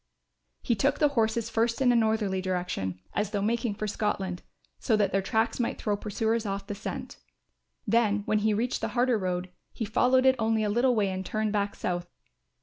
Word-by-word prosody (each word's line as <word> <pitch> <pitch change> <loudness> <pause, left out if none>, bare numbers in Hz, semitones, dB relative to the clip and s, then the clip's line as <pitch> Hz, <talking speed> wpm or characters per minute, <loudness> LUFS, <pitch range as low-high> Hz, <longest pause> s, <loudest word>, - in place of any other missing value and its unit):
He 240 - +2
took 275 +7 +1
the 295 - +4
horses 230 -3 0
first 230 +2 +1
in 255 -2 +4
a - - +3
northerly 220 -4 +1
direction 180 - -2
as 205 -1 0
though 205 -1 -2
making 230 0 0
for 215 - -3
Scotland, 195 -3 -2 0.4
so 225 - +2
that 210 -2 +2
their 195 - +2
tracks 220 +5 0
might 235 - -1
throw 210 -2 0
pursuers 220 +2 -1
off 200 -2 -3
the 205 - -4
scent. 205 +2 -6 0.7
Then 210 -2 +2
when 215 - +2
he 215 +1 +2
reached 230 +4 -1
the - - 0
harder 245 -2 +3
road, 180 -1 -2 0.2
he 225 - -4
followed 255 +5 +3
it 260 0 +6
only 220 -1 +1
a 210 - 0
little 245 +3 +3
way 205 -3 +2
and 190 0 -3
turned 215 +2 -1
back 205 -1 0
south. 175 -1 -3
215 Hz, 200 wpm, -28 LUFS, 200-230 Hz, 0.7 s, it